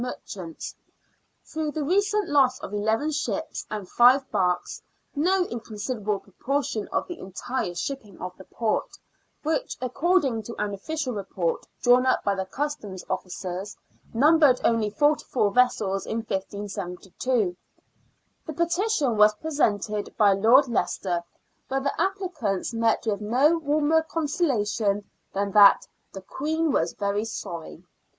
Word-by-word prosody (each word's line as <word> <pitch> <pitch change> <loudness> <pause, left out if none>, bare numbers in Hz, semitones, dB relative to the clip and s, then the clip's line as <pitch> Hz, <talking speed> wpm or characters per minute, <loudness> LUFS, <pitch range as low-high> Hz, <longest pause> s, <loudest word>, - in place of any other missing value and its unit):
63 225 -5 -6
merchants, 165 - -8 0.7
through 315 -1 -3
the 310 - -2
recent 405 +6 +1
loss 265 -3 +3
of 310 - -7
eleven 220 +8 0
ships 300 +1 -3
and 210 -3 -5
live 260 +3 +6
barks 180 -4 0 0.2
— - - -43
no 360 +5 +2
inconsiderable 215 - -3
proportion 240 +2 -3
of - - -2
the 350 -2 -7
entire 190 0 -4
shipping 210 +1 -5
of 180 0 -6
the 190 - -12
port, 225 -2 -2 0.5
which, 320 +12 -1
according 275 -1 +1
to 230 +2 -8
an 205 -1 -2
official 280 +6 -3
report 190 -4 -2 0.2
drawn 250 +1 +5
up 255 - +2
by 200 - +2
the 190 -1 -3
Customs 220 -7 -4
officers, 185 +2 -4 0.3
numbered 290 +1 +5
only 225 -2 +2
forty 295 +8 +2
four 210 -5 +1
vessels 210 -5 +2
in 225 - -2
1572. 195 +1 -3 0.9
The 315 - -4
petition 340 - +1
was 210 0 +6
presented 210 -8 -1
by 205 -3 +5
Lord 235 +8 +5
Leicester, 180 -6 -1 0.5
but 270 0 -1
the 280 +3 -1
applicants 360 - -2
met 230 0 +1
with 210 -2 -1
no 270 +10 +3
warmer 305 +1 +2
consola 310 -7 0
tion 205 -2 0 0.2
than 200 0 -1
that 205 0 +7
" - - -46
the 195 - -7
Queen 315 +8 -1
was 165 -7 +1
very 200 +1 -1
sorry." 170 -6 -7
230 Hz, 140 wpm, -25 LUFS, 200-295 Hz, 0.9 s, that